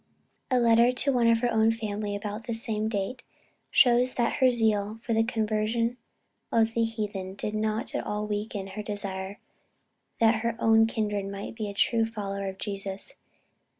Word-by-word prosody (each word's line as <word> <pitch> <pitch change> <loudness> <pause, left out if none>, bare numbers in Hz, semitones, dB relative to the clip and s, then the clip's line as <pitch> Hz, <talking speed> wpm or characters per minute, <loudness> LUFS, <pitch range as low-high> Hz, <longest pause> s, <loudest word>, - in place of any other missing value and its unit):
A 255 - +3
letter 235 +1 +5
to 270 +2 +1
one 240 -2 +3
of 230 0 +4
her 245 -1 +1
own 220 0 +4
family 210 -2 -3
of 205 - -6
about 210 +1 -5
the 230 - -2
same 220 -1 -1
date, 220 +4 -3 0.5
shows 250 -1 +4
that 240 -1 0
her 260 - +7
zeal 220 -3 +1
for 230 - -1
the 225 0 +3
conversion 225 +1 0 0.6
of 225 0 +3
the 230 - +2
heathen, 205 -4 -3
did 210 - -4
not 215 +3 -1
at - - -2
all 210 0 -2
weaken 210 -1 -3
her 205 +2 -5
desire 200 -1 -4 0.8
that 225 0 +4
her 235 0 -1
own 225 -1 +5
kindred 210 -3 -2
might 200 0 -6
be 215 -3 -4
true 225 +3 +2
followers 200 -3 -4
of 190 - -8
Jesus. 200 - -5
220 Hz, 175 wpm, -27 LUFS, 205-230 Hz, 0.8 s, her